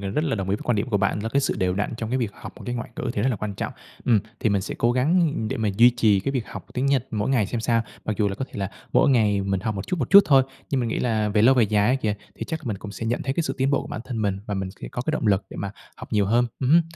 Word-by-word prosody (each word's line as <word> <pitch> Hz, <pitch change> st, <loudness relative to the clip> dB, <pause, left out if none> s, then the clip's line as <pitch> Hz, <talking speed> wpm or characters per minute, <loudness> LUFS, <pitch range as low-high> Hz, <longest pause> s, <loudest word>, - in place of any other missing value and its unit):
gần 100 Hz, -1 st, -4 dB
rất 155 Hz, -, +1 dB
là 135 Hz, -, 0 dB
đồng 95 Hz, -2 st, -3 dB
ý 100 Hz, -, +2 dB
với -, -, -9 dB
quan 120 Hz, -, +1 dB
điểm 105 Hz, +5 st, -1 dB
của 105 Hz, -, +3 dB
bạn, 100 Hz, +1 st, 0 dB
là 110 Hz, -, -2 dB
cái 140 Hz, +5 st, +2 dB
sự -, -, 0 dB
đều 90 Hz, -1 st, +1 dB
đặn 105 Hz, +3 st, -2 dB
trong 110 Hz, 0 st, -4 dB
cái 130 Hz, -, +1 dB
việc 115 Hz, -5 st, -1 dB
học -, -, -9 dB
một -, -, -11 dB
cái 120 Hz, -, -2 dB
ngoại 120 Hz, +1 st, -5 dB
ngữ -, -, -2 dB
thì -, -, -1 dB
rất 130 Hz, -, +2 dB
là 120 Hz, -, 0 dB
quan 105 Hz, 0 st, -4 dB
trọng. -, -, -4 dB, 0.3 s
Ừm, 115 Hz, -4 st, +4 dB, 0.2 s
thì 110 Hz, -, +2 dB
mình 100 Hz, -1 st, +2 dB
sẽ -, -, -5 dB
cố 120 Hz, +1 st, +3 dB
gắng, 145 Hz, +9 st, +3 dB, 0.2 s
ư, -, -, -2 dB
để 135 Hz, -, -2 dB
mà 110 Hz, -3 st, 0 dB
duy 120 Hz, +3 st, +7 dB
trì 110 Hz, -5 st, +3 dB
cái 135 Hz, +8 st, -2 dB
việc 125 Hz, -5 st, -2 dB
học -, -, -8 dB
tiếng 130 Hz, +2 st, 0 dB
Nhật 135 Hz, -2 st, +2 dB
mỗi 105 Hz, -1 st, -1 dB
ngày 120 Hz, -7 st, +2 dB
xem 115 Hz, +2 st, -3 dB
sao. 115 Hz, 0 st, +2 dB, 0.2 s
Mặc 110 Hz, -, -2 dB
dù 105 Hz, 0 st, +2 dB
là 95 Hz, -, -3 dB
có 135 Hz, -, -3 dB
thể -, -, -26 dB
là 95 Hz, 0 st, -2 dB, 0.2 s
mỗi -, -, +4 dB
ngày 105 Hz, -5 st, +3 dB
mình 95 Hz, -1 st, -1 dB
học 110 Hz, +1 st, -2 dB
một 95 Hz, -, -5 dB
chút, 180 Hz, -, -2 dB
một 125 Hz, -, -2 dB
chút 200 Hz, 0 st, +10 dB
thôi, 135 Hz, -3 st, +6 dB, 0.3 s
nhưng 135 Hz, -, +1 dB
mình 120 Hz, -, -1 dB
nghĩ -, -, -1 dB
là 110 Hz, -3 st, +1 dB
về 105 Hz, 0 st, +2 dB
lâu, 130 Hz, +4 st, +6 dB
về 125 Hz, -, +4 dB
dài 105 Hz, +1 st, +2 dB
á 125 Hz, -, +4 dB
kìa, 110 Hz, -6 st, -1 dB, 0.2 s
thì -, -, -5 dB
chắc 160 Hz, -3 st, -5 dB
mình 105 Hz, -5 st, -2 dB
cũng 105 Hz, -, -8 dB
sẽ 115 Hz, -, -5 dB
nhận 120 Hz, +2 st, -1 dB
thấy 135 Hz, -, -1 dB
cái 170 Hz, -, +1 dB
sự -, -, -2 dB
tiến 135 Hz, +1 st, +2 dB
bộ 140 Hz, -, 0 dB
bản -, -, -5 dB
thân 115 Hz, -4 st, -3 dB
mình 100 Hz, -2 st, 0 dB
và 105 Hz, -, -2 dB
mình 95 Hz, -1 st, -2 dB
sẽ -, -, -6 dB
có 120 Hz, -, -4 dB
cái 155 Hz, -, -1 dB
động 155 Hz, -, -1 dB
lực 100 Hz, -1 st, +3 dB
để -, -, -9 dB
mà 100 Hz, -, -3 dB, 0.3 s
học -, -, -10 dB
nhiều 105 Hz, -2 st, +3 dB
hơn. 120 Hz, +4 st, +3 dB
Ừm 130 Hz, -, +1 dB
hưm. 170 Hz, +2 st, +7 dB
115 Hz, 355 wpm, -24 LUFS, 100-130 Hz, 0.3 s, chút